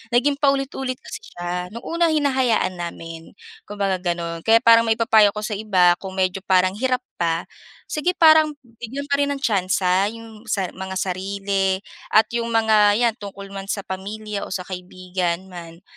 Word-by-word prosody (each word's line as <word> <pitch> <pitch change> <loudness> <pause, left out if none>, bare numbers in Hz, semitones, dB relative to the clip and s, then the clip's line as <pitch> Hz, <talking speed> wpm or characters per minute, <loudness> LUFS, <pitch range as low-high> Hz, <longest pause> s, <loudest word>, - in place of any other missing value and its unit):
naging 280 +3 +2
paulit-ulit 270 -2 0
kasi 440 - -7 0.2
siya 175 +1 -4
nu'ng 235 +4 -9
unang 335 0 +1
hinahayaan 260 -9 +1
namin 165 -1 -7 0.4
kumbaga 200 -3 -1
gano'n 170 -2 -3
kaya 225 +5 +5
parang 230 0 +8
maipapayo 220 -2 +5
ako 210 +1 -5
sa 215 - -3
iba 190 -4 +3
kung 190 -1 -7
medyo 185 0 0
parang 185 -1 +2
hirap 255 +3 0 0.2
pa 165 0 +1 0.5
sige 350 +4 -1
parang 315 -1 +6 0.3
bigyan 260 +5 -5
pa 280 - +1
rin 285 - +2
ang 280 -1 -3
tsansa 190 -3 +1
'yong 225 0 -12
sa 190 -4 -1
mga 190 0 -7
sarili 195 +1 -1 0.4
at 215 - +7
'yong 235 0 -1
mga 220 -2 +4
'yan 235 -2 +2
tungkol 200 -1 -9
man 195 0 -7
sa 200 0 -3
pamilya 205 +2 -5
o - - -12
sa 185 - -3
kaibigan 185 0 -4
man 170 0 -10
200 Hz, 165 wpm, -22 LUFS, 185-235 Hz, 0.5 s, parang